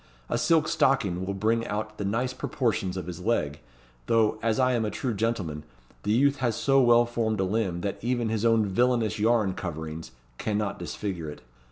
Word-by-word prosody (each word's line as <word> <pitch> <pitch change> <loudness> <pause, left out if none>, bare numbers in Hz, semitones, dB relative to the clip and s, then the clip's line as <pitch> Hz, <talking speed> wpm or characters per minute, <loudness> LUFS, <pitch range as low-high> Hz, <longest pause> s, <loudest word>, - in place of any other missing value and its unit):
A - - 0
silk 165 -2 +3
stocking 130 - +1
will 100 - -2
bring 115 +3 +1
out 110 +1 -4
the 100 - -2
nice 125 +6 -1
proportions 105 -8 -1
of 90 - -4
his 90 -1 -6
leg; 75 -9 0 0.5
though, 110 -1 +2
as 115 -1 +1
I 130 0 +3
am 120 -2 +1
a 105 - -1
true 125 +2 -2
gentleman, 100 -8 -2 0.4
the 105 - -1
youth 140 +5 +3
has 120 -4 0
so 135 0 +3
well 120 -1 +5
formed 115 -3 -1
a - - +2
limb 95 -3 -1
that 100 +2 -3
even 120 -1 0
his 110 -1 -1
own 115 -2 +4
villainous 115 +2 +1
yarn 110 -3 +2
coverings 80 -4 -6 0.3
cannot 105 -1 -1
disfigure 85 -2 -4
it. 75 - -10
110 Hz, 190 wpm, -27 LUFS, 95-120 Hz, 0.5 s, well